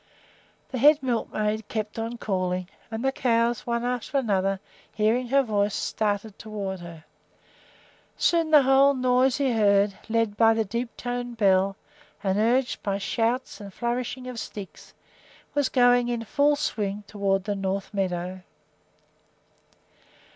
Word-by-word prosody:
The 255 - -4
head 295 +4 +7
milkmaid 220 -3 -1
kept 215 0 -4
on 230 +2 -4
calling, 185 -4 -2 0.2
and 225 +3 -4
the 270 - +3
cows, 235 -2 0
one 235 0 -1
after 250 +2 -2
another, 195 -6 +1 0.3
hearing 225 +4 +1
her 275 +3 +3
voice, 205 -3 0
started 210 -1 -2
toward 200 -3 -5
her. 170 -2 -11 1.1
Soon 335 -2 +2
the 300 -3 +7
whole 270 +1 +5
noisy 255 +1 +2
herd, 200 -2 +3
led 225 -2 +1
by 225 +1 +5
the 225 -1 0
deep 235 +3 -4
toned 245 -1 -4
bell 195 -2 +3 0.5
and 195 0 +1
urged 245 +4 +1
by 200 -1 -1
shouts 230 +4 -1
and 200 -1 -8
flourishing 245 +3 -3
of 250 -2 -6
sticks, 200 -4 -9 0.6
was 285 -2 +1
going 245 -1 +4
in 240 -1 -2
full 290 +6 +2
swing 210 -8 -2
toward 195 -2 0
the 205 - -2
north 195 +1 -3
meadow. 185 -1 -2
225 Hz, 135 wpm, -25 LUFS, 200-250 Hz, 1.1 s, head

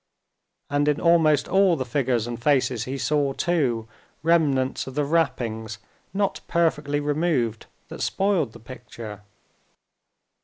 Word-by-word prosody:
And 145 +1 0
in 150 0 +2
almost 160 -4 +4
all 190 -2 +4
the 130 -4 -3
figures 125 -3 0
and 120 -1 -6
faces 130 -3 +1
he 135 +2 -4
saw, 140 0 0
too, 130 -10 0 0.4
remnants 145 -7 +2
of 130 - -8
the 145 -1 +1
wrappings 120 -9 -1 0.3
not 195 +1 -1
perfectly 150 -4 +1
removed 145 -6 0 0.2
that - - -8
spoiled 190 - 0
the - - -12
picture. 115 -3 -10
140 Hz, 125 wpm, -24 LUFS, 120-160 Hz, 0.4 s, almost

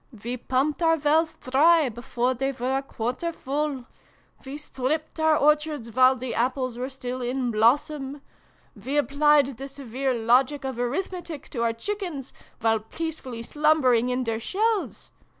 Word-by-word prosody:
We 240 +2 -2
pumped 265 +6 -1
our 325 -1 +4
wells 315 +2 +2
dry 310 +4 +4
before 240 +2 -1
they 270 +2 -2
were 255 +1 -1
a - - -1
quarter 255 +5 -3
full 285 -3 -3 0.6
we 275 +2 -6
stripped 300 +2 -3
our 315 -1 +4
orchards 300 -5 +1
while 255 +2 +6
the 255 -1 -5
apples 255 +1 -1
were 250 +2 -4
still 255 -1 -5
in 250 0 -1
blossom 270 +5 +1 0.5
we 255 +8 -3
applied 285 -2 +3
the 275 - -5
severe 265 -1 -3
logic 255 +5 +2
of 260 -3 -4
arithmetic 325 +4 -4
to 235 - -4
our 230 -1 +1
chickens, 345 - -5 0.3
while 225 -1 +3
peacefully 255 0 -6
slumbering 260 -4 +3
in 250 +1 0
their 225 -2 -2
shells 420 - -1
270 Hz, 150 wpm, -25 LUFS, 245-300 Hz, 0.6 s, while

